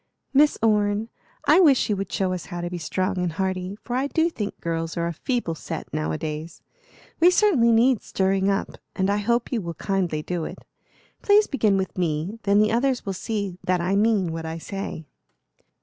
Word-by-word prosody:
"Miss 295 +2 +5
Orne, 210 0 +2 0.4
I - - +7
wish 290 -8 +5
you 210 - +1
would 195 -1 -4
show 185 -1 0
us 180 - -5
how 175 0 -5
to 175 0 -4
be 175 - -4
strong 185 +4 -1
and 175 -2 -1
hearty, 185 +2 -2
for 245 - -4
I 265 +2 +1
do 325 +3 +1
think 210 -9 -5
girls 165 0 -3
are 170 - 0
a 170 - -2
feeble 235 - -2
set 160 - -7
now 75 +1 -1
a 80 - -2
days. 155 +1 -6 0.6
We 340 +2 +7
certainly 360 - +4
need 235 +1 +4
stirring 190 0 0
up, 195 0 -2 0.2
and 190 0 +1
I 205 - +1
hope 235 +3 0
you 235 -4 0
will 170 -2 -5
kindly 180 -6 -1
do 175 -1 -3
it. - - -6 0.6
Please 415 +1 +5
begin 215 - +1
with 190 -1 -3
me, 170 +5 -1
then 200 0 +4
the 215 +1 +4
others 250 +2 +1
will 195 - -2
see 200 -2 -4
that 180 0 +1
I 180 +3 0
mean 205 -4 +2
what 165 0 -5
I 160 0 -4
say." 195 -2 -6
195 Hz, 205 wpm, -24 LUFS, 175-230 Hz, 0.6 s, I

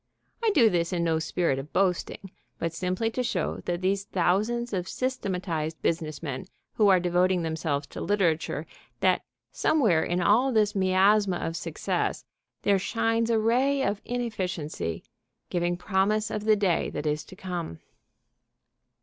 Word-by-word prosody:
I 455 - +4
do 235 -6 +7
this 170 -4 +1
in 175 -2 0
no 165 -1 +1
spirit 160 -3 0
of 140 +3 -8
boasting, 190 0 0 0.3
but 165 -1 -2
simply 185 +6 -1
to 250 - -2
show 190 -9 -1
these 185 +3 -1
thousands 210 +7 0
of 185 -1 -2
systematized 180 -11 -2
business 160 -2 -1
men 130 -4 -4 0.3
who 210 - +3
are 190 -2 +6
devoting 180 0 +2
themselves 160 -3 -2
to - - -7
literature 165 -6 0 0.4
that - - +3 0.3
somewhere 220 - +3
in 175 +1 -1
all 225 +9 +4
this 215 -3 +2
miasma 190 0 +3
of 165 - -3
success - - -2 0.4
there 200 -1 +3
shines 225 +3 0
a 230 - +3
ray 260 +5 +2
of 200 -2 -1
inefficiency, 185 - -3 0.5
giving 175 0 0
promise 210 +4 +1
of 210 -1 -3
the 215 -1 +5
day 195 -5 +1
that 150 - -5
is 150 0 0
to - - -12
come. 175 - -5
185 Hz, 150 wpm, -27 LUFS, 170-215 Hz, 0.5 s, do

